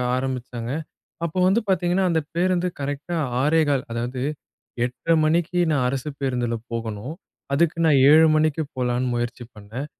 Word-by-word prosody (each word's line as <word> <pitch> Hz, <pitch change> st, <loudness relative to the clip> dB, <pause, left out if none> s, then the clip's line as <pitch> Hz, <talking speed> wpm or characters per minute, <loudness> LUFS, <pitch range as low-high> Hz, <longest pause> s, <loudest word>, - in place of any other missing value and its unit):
ஆரம்பிச்சாங்க. 125 Hz, -2 st, -4 dB, 0.5 s
அப்போ 170 Hz, +2 st, -5 dB
வந்து 195 Hz, +5 st, +4 dB
பார்த்தீங்கன்னா, 185 Hz, 0 st, +2 dB
அந்த 165 Hz, -2 st, +2 dB, 0.2 s
பேருந்து 180 Hz, 0 st, +1 dB
கரெக்ட்டா 145 Hz, +5 st, -3 dB, 0.3 s
6:15 150 Hz, -3 st, +2 dB
அதாவது 120 Hz, +2 st, -3 dB, 0.6 s
8:30 145 Hz, +6 st, 0 dB
மணிக்கு 170 Hz, +3 st, +1 dB
நான் 135 Hz, -4 st, +1 dB
அரசு 135 Hz, +2 st, -3 dB
பேருந்துல 125 Hz, -3 st, -1 dB, 0.2 s
போகணும். 115 Hz, +3 st, -4 dB, 0.4 s
அதுக்கு 165 Hz, +3 st, +2 dB
நான் 145 Hz, -4 st, +5 dB
7:00 160 Hz, +2 st, +7 dB
மணிக்கு 155 Hz, 0 st, +2 dB
போலான்னு 125 Hz, 0 st, 0 dB
முயற்சி 120 Hz, +1 st, -3 dB
பண்ணேன். 110 Hz, +7 st, -7 dB
140 Hz, 130 wpm, -23 LUFS, 125-165 Hz, 0.6 s, 7:00